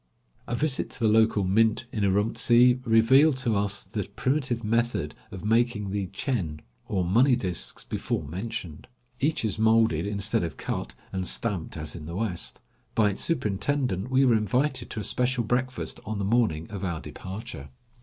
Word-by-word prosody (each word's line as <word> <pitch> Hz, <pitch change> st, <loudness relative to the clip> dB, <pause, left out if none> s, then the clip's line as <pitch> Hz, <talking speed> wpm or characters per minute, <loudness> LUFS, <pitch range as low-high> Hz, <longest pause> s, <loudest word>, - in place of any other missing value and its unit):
A 120 Hz, -, -1 dB
visit 145 Hz, +1 st, 0 dB
to -, -, -8 dB
the 115 Hz, -, +2 dB
local 110 Hz, -1 st, +4 dB
mint 110 Hz, +5 st, +2 dB
in 105 Hz, -, -2 dB
Urumtsi 120 Hz, +5 st, +4 dB
revealed 130 Hz, +6 st, +5 dB
to 120 Hz, -4 st, 0 dB
us 100 Hz, 0 st, -1 dB
the 105 Hz, 0 st, -4 dB
primitive 130 Hz, -3 st, 0 dB
method 115 Hz, -8 st, 0 dB, 0.2 s
of 95 Hz, +1 st, -8 dB
making 110 Hz, -2 st, +1 dB
the 100 Hz, -1 st, -2 dB
chen, 90 Hz, -, -3 dB, 0.3 s
or 95 Hz, -4 st, 0 dB
money 120 Hz, +9 st, +4 dB
disks 95 Hz, -8 st, -4 dB
before -, -, -3 dB
mentioned. 90 Hz, 0 st, -6 dB, 0.3 s
Each 150 Hz, -4 st, 0 dB
is 105 Hz, -1 st, -2 dB
molded 110 Hz, -6 st, +3 dB
instead 105 Hz, +2 st, +1 dB
of 80 Hz, -5 st, -4 dB
cut -, -, -4 dB, 0.2 s
and 95 Hz, -1 st, -1 dB
stamped 100 Hz, -8 st, 0 dB
as 80 Hz, -1 st, -3 dB
in 80 Hz, -3 st, -8 dB
the 85 Hz, -, -6 dB
West. 95 Hz, -4 st, -2 dB, 0.3 s
By 105 Hz, -2 st, +4 dB
its 95 Hz, -, -5 dB
superintendent 125 Hz, -, -1 dB
we 130 Hz, +1 st, +4 dB
were 125 Hz, -, +5 dB
invited 125 Hz, +5 st, 0 dB
to -, -, -5 dB
a -, -, -4 dB
special 125 Hz, +1 st, +1 dB
breakfast 125 Hz, +2 st, -2 dB
on 110 Hz, 0 st, -4 dB
the 100 Hz, -, -2 dB
morning 105 Hz, -8 st, +1 dB
of 100 Hz, -2 st, -5 dB
our 85 Hz, -4 st, -2 dB
departure. 95 Hz, -, -8 dB
110 Hz, 170 wpm, -27 LUFS, 95-120 Hz, 0.3 s, revealed